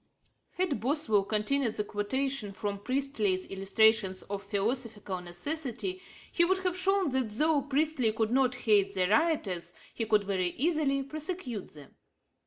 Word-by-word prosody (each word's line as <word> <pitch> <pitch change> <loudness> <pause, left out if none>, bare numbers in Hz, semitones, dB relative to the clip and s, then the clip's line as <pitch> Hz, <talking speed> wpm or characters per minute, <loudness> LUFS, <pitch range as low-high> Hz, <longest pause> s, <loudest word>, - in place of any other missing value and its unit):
Had 355 - -1
Boswell 250 -6 +2
continued 220 +3 0
the 210 - -1
quotation 215 +2 -2
from 200 0 -4
Priestley's 220 -6 0
Illustrations 195 0 +2
of 200 -1 -5
Philosophical 205 -1 -2
Necessity 285 - -4 0.3
he 340 - +4
would 375 +2 +3
have 365 -1 0
shown 380 -3 +2
that 260 -3 +1
though 295 +7 +2
Priestley 285 -4 +1
could 220 0 -1
not 255 -1 +2
hate 205 -4 +2
the 185 -1 +2
rioters, 200 - 0 0.2
he 225 - -3
could 215 -1 +3
very 185 -3 -1
easily 290 -2 +1
prosecute 300 - -5
them. 145 -2 -14
230 Hz, 140 wpm, -30 LUFS, 200-290 Hz, 0.3 s, he